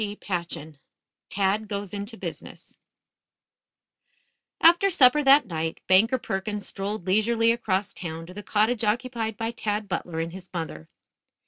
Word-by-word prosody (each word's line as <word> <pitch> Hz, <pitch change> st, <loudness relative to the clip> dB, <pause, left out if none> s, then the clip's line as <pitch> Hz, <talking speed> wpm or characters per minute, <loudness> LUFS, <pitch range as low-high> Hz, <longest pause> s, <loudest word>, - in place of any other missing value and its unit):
CHAPTER 185 Hz, -5 st, -3 dB
III 150 Hz, -1 st, -13 dB, 0.5 s
TAD 200 Hz, +2 st, 0 dB
GOES 200 Hz, -2 st, -5 dB
INTO 205 Hz, +3 st, -5 dB
BUSINESS -, -, -9 dB, 1.8 s
After 345 Hz, +4 st, +6 dB
supper, 295 Hz, -4 st, +6 dB
that 280 Hz, 0 st, +6 dB
night, 160 Hz, -4 st, -3 dB
Banker 220 Hz, +8 st, +4 dB
Perkins 205 Hz, -1 st, -4 dB
strolled 200 Hz, -1 st, -4 dB
leisurely 225 Hz, +4 st, +3 dB
across 205 Hz, -4 st, -1 dB
town 165 Hz, -2 st, -6 dB
to 180 Hz, -, -11 dB
the 205 Hz, -, -7 dB
cottage 215 Hz, +3 st, +1 dB
occupied 225 Hz, 0 st, -1 dB
by 225 Hz, 0 st, -2 dB
Tad 210 Hz, -3 st, -3 dB
Butler 175 Hz, -3 st, -4 dB
and 165 Hz, +1 st, -3 dB
his 190 Hz, 0 st, -10 dB
mother. 160 Hz, -, -6 dB
205 Hz, 135 wpm, -25 LUFS, 185-230 Hz, 1.8 s, After